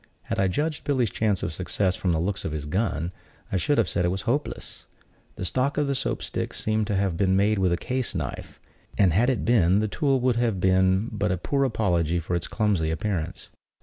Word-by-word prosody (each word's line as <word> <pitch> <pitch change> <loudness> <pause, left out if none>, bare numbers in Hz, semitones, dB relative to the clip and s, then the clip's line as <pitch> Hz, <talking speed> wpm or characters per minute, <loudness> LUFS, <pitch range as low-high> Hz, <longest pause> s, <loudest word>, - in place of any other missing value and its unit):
Had - - -3
I 95 - +3
judged 150 - -2
Billy's 130 -7 +1
chance 105 -4 0
of 90 -4 -2
success 95 +4 0
from 90 - 0
the 80 - +1
looks 100 +5 -2
of 80 - -3
his 75 -2 -4
gun, 90 0 -1 0.4
I 95 - +1
should 145 - +1
have 115 -5 +3
said 90 - 0
it - - +2
was 95 +1 -2
hopeless. 140 +5 -3 0.5
The - - -4
stock 130 +8 0
of 140 -2 +1
Soap - - -2
stick - - -4
seemed 110 -1 0
to 105 - 0
have 95 -3 0
been 95 +1 +2
made 105 +2 +2
with 95 -2 +2
a 85 - +2
case 125 -1 -3
knife; 75 -8 -5 0.4
and 95 -5 +4
had 115 +8 +3
it 130 - -1
been, 100 -6 +4
the 110 +1 +1
tool 135 +4 +1
would 125 -2 +2
have 115 -5 +1
been 95 +2 +3
but 105 -4 -1
a 90 - 0
poor 140 +10 0
apology 85 - +1
for 85 +2 -2
its 85 - -2
clumsy 100 -8 0
appearance. 85 -1 -3
100 Hz, 220 wpm, -25 LUFS, 90-115 Hz, 0.5 s, and